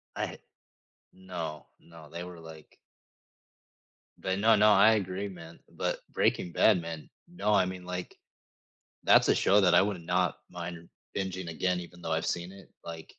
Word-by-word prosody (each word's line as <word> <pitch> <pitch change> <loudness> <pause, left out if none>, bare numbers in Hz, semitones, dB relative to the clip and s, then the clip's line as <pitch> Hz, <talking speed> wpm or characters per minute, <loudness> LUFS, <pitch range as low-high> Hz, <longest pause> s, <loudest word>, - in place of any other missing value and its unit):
I - - -4 0.7
No, 90 -5 -7
no. 80 -3 -15
They 85 +1 -6
were, 90 -1 -10
like 80 -2 -13 1.4
But 95 +1 -2
no, 110 +2 +5
no, 105 0 +6
I 105 +3 +7
agree, 95 -1 -2
man. 85 -3 -11
But, - - -2
Breaking 90 - +1
Bad, 95 0 +4
man. 80 -2 -7 0.2
No. 105 -12 -1
I 95 - +4
mean, 90 -1 -6
like, 90 0 -5 0.9
that's - - +5
a - - +5
show 100 +2 +4
that 90 -2 +5
I 90 - +7
would 100 -3 -2
not 90 +1 0
mind 85 -1 -7 0.3
bingeing 95 -3 -3
again, 90 +2 0
even 90 0 -11
though 80 - -4
I've 80 0 0
seen 85 +1 -2
it, 100 0 -14
like 80 -1 -8
90 Hz, 165 wpm, -29 LUFS, 85-95 Hz, 1.4 s, I